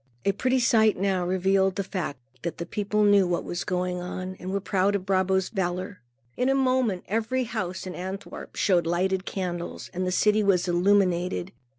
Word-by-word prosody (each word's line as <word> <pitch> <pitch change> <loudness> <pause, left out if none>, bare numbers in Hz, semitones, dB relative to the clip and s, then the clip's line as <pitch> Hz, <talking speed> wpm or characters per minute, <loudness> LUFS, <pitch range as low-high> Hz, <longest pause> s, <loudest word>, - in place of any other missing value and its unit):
A 200 - +4
pretty 255 +6 +1
sight 220 -3 +4
now 190 -1 +1
revealed 190 +1 +2
the 200 - -1
fact 180 -8 -4 0.2
that 170 - -4
the 170 - -4
people 210 +3 0
knew 205 -2 +5
what 175 -1 -1
had - - -10
been 175 - -3
going 180 0 -1
on 185 +1 -5
and 180 - -6
were 200 +1 0
proud 195 0 +1
of 190 -2 -2
Brabo's 190 -1 +1
valor. 185 -1 -3 0.3
In 250 +1 +1
a 270 - +3
moment, 255 -8 +1
every 225 +5 0
house 195 -7 -4
in 185 - -5
Antwerp 190 +3 -7
showed 175 -4 +2
lighted 185 +2 0
candles, 175 -3 -4
and 185 0 -2
the - - 0
city 210 +3 +3
was 195 -3 +2
illuminated. 180 0 +2
190 Hz, 190 wpm, -26 LUFS, 180-205 Hz, 0.3 s, knew